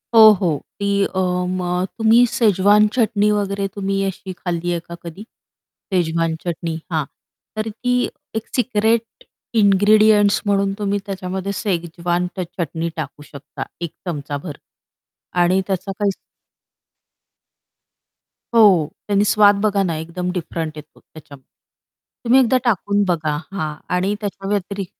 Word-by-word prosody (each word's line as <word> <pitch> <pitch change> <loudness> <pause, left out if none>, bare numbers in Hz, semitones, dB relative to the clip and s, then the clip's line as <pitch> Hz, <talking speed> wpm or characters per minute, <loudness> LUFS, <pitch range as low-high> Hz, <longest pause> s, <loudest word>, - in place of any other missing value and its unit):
हो, 220 -1 +10
हो. 160 -5 +1 0.2
ती 200 0 +1
अ, 190 - -3 0.4
मग 180 0 -1
तुम्ही 225 +2 +5
शेजवान 210 -1 +4
चटणी 215 -4 +2
वगैरे 200 -1 -1
तुम्ही 195 -1 -1
अशी 190 0 -6
खाल्ली 175 -1 -3
आहे 170 - -1
का 170 +1 -10
कधी? 170 +4 -8 0.7
शेजवान 165 -2 +1
चटणी 170 -1 -3 0.2
हां. 155 -3 0 0.5
तर 215 +1 -2
ती 245 +3 -2 0.4
एक 220 - -3
सिक्रेट 230 -2 0 0.3
इनग्रीडिएंट्स 205 0 +5
म्हणून 200 -1 +1
तुम्ही 205 -1 0
त्याच्यामध्ये 190 0 -4
शेजवान 175 -2 -1
ट - - -7 0.2
चटणी 165 0 -2
टाकू 145 -2 -6
शकता 140 - -8 0.2
एक 170 -2 -3
चमचाभर. 145 -2 -5 0.8
आणि 185 +2 +3
त्याचा 190 0 -2
काही 205 -1 +2 2.4
हो, 190 -9 +6 0.2
त्यानी 205 -1 +2
स्वाद 205 -1 +5
बघा 205 -2 +2
ना 170 -4 -1
एकदम 175 +3 -4
डिफरंट 165 -3 -4
येतो 150 +1 -13
त्याच्याम 145 -3 -15
तुम्ही 240 - -3
एकदा 260 0 +4
टाकून 205 -3 +1
बघा. 155 -4 0 0.2
हां. 155 -6 -3 0.2
आणि 190 +3 +1
त्याच्या 195 -1 -5
व्यतिरि 200 -1 -2
195 Hz, 125 wpm, -20 LUFS, 170-205 Hz, 2.4 s, हो